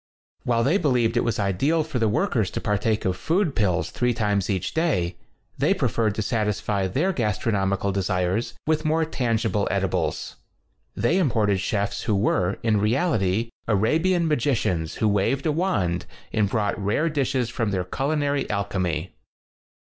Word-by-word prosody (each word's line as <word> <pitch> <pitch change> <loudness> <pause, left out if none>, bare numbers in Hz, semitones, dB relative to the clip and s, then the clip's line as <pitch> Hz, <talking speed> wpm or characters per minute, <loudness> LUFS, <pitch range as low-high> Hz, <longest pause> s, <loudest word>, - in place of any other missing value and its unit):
While 115 -1 +2
they 160 +11 +3
believed 125 - +2
it 120 - +2
was 115 -2 -1
ideal 135 - +1
for 150 -5 -3
the 110 -1 +2
workers 115 - +1
to - - -4
par 105 - 0
take 110 0 0
of 95 -1 +1
food 165 - 0
pills 95 -5 +1
three 125 -1 0
times 105 -4 0
each 95 -3 -1
day, 130 - 0 0.4
they - - +3
preferred 110 -3 0
to 110 - -1
satisfy 105 -3 -1
their 160 - 0
gastronomical 100 - 0
desires 95 +2 -1
with 155 0 +1
more 160 +1 +2
tan 125 -7 0
gible 105 -3 0
edibles. 95 -2 -1 0.6
They 165 +11 +2
imported 110 - +2
chefs 100 +2 -1
who 110 - 0
were, 100 -2 +1
in 110 -2 +2
reality, 115 - +1 0.2
Arabian 160 - +2
magi 145 -2 +1
cians 80 -7 -1
who 110 - +1
waved 105 +7 +1
a 155 - +2
wand 145 - 0 0.3
and 105 -3 +2
brought 105 -2 -1
rare 110 +11 +1
dishes 135 -6 0
from 115 -3 -1
their 95 -2 -1
culinary 140 - -1
al 100 -1 0
chemy. 90 -3 -2
110 Hz, 165 wpm, -24 LUFS, 100-140 Hz, 0.6 s, they